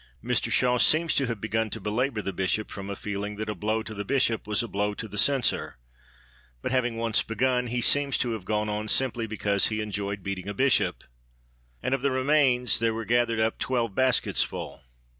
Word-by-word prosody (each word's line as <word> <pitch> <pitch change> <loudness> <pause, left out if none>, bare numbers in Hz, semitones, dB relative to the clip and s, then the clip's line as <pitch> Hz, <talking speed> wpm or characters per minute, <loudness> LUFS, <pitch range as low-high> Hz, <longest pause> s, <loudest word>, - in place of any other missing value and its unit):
Mr 120 -1 0
Shaw 125 +1 +3
seems 160 +4 +3
to 135 - +1
have 115 -3 -3
begun 110 +1 -1
to - - -5
belabour 110 +3 -1
the 95 - -3
Bishop 95 +3 -1
from 100 0 -7
a 100 - -3
feeling 105 +1 -4
that 105 +1 -3
a - - -3
blow 110 +4 -1
to 110 - -7
the 100 -1 -4
Bishop 115 -2 0
was 105 +2 +1
a - - -4
blow 105 0 -1
to 110 - -6
the 105 - -10
Censor, 135 - +2 0.9
but - - -2
having 120 -3 0
once 115 -1 +1
begun, 125 +2 0
he 120 +1 -2
seems 140 +2 +3
to 120 - 0
have 110 -4 -4
gone 105 +2 -1
on 105 +1 -3
simply 120 -1 +2
because 100 -2 +1
he 110 -1 -2
enjoyed 100 -2 -4
beating 95 0 -4
a 105 - -5
Bishop. 130 +3 +2 0.8
And 130 - 0
of 135 - 0
the 140 - +2
remains 130 -3 +2
there 115 0 +1
were 115 0 -4
gathered 120 -1 +1
up 110 0 0
twelve 120 -5 -1
basketsful. 130 +2 0
115 Hz, 205 wpm, -26 LUFS, 105-125 Hz, 0.9 s, Shaw